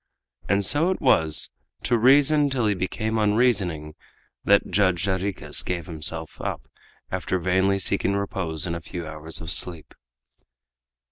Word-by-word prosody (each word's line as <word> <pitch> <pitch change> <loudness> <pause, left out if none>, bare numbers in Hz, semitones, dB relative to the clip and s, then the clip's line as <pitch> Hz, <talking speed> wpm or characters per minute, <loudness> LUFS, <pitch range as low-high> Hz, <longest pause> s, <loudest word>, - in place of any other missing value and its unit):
And 100 0 +2
so 150 - +3
it 190 - -2
was 80 -1 +1 0.3
"to 120 - +1
reason 140 +5 +4
till 130 -4 -1
he 105 - +2
became 110 +4 -3
unreasoning" 100 -8 +1 0.5
that 100 -1 +3
Judge 95 -2 +1
Jarriquez 95 0 -1
gave 85 -3 -4
himself 80 0 -4
up - - -4 0.5
after 95 - -2
vainly 95 +2 +1
seeking 100 +1 0
repose 95 -6 -3
in 85 - -3
a 85 - -5
few 85 +1 -7
hours 80 +1 -4
of 80 +1 +5
sleep. 85 -3 +1
95 Hz, 140 wpm, -24 LUFS, 85-110 Hz, 0.5 s, of